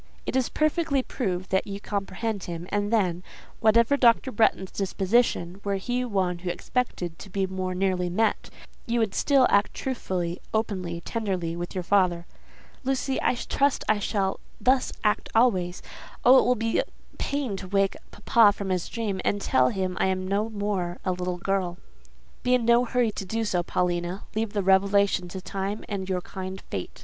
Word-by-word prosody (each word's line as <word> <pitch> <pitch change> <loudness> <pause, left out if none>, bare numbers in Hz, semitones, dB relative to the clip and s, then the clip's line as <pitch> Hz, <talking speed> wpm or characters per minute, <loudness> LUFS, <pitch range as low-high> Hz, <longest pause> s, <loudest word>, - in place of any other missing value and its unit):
"It - - -3
is 260 -2 +2
perfectly 310 -3 +1
proved 185 -9 -3
that 190 +2 +1
you 200 0 -5
comprehend 200 +1 -3
him, 170 0 -5
and 205 +1 0
then—whatever 220 +5 +1
Dr. 245 +1 +4
Bretton's 205 -4 +2
disposition, 195 -2 0
were 200 -1 0
he 245 +6 -1
one 190 -7 -1
who 180 0 -4
expected 175 -3 -2
to 195 - -10
be 195 +1 0
more 185 -1 -3
nearly 185 -1 0
met—you 225 +3 -2
would 220 -4 +1
still 275 -3 +4
act 200 +1 +3
truthfully, 185 -9 -3
openly, 185 -6 -2
tenderly, 185 -8 -2
with 175 +3 -5
your 185 - -2
father." 175 -2 +2 0.6
"Lucy, 265 0 -1
I - - +2
trust 280 +3 0
I 215 -1 +3
shall 195 -2 -1 0.2
thus 255 0 +2
act 210 -1 +1
always. 185 -7 +2 0.4
Oh, 255 +2 +9
it - - +2
will 250 - +3
be 225 0 +1 0.4
pain 280 -7 -1
to 190 - -7
wake 195 0 +1
papa 210 0 +4
from 200 -1 -4
his 180 -2 -1
dream, 210 -5 -2
and 205 - +1
tell 130 -9 +3
him 185 +1 -2
I - - +3
am 185 0 -1
no 205 +3 0
more 200 -4 -2
a 185 - +2
little 180 0 -2
girl!" 180 -1 -1 0.6
"Be 250 0 +3
in 240 -2 0
no 235 +1 +5
hurry 240 -2 +1
to 200 - -5
do 225 +4 -2
so, 180 -4 +1
Paulina. 175 +1 -1
Leave 220 0 -2
the 205 -2 0
revelation 195 -1 +3
to 185 +2 -7
Time 195 +3 -4
and 195 -2 -4
your 185 -1 0
kind 190 +1 -6
Fate. 95 - -5
195 Hz, 175 wpm, -26 LUFS, 185-225 Hz, 0.6 s, Oh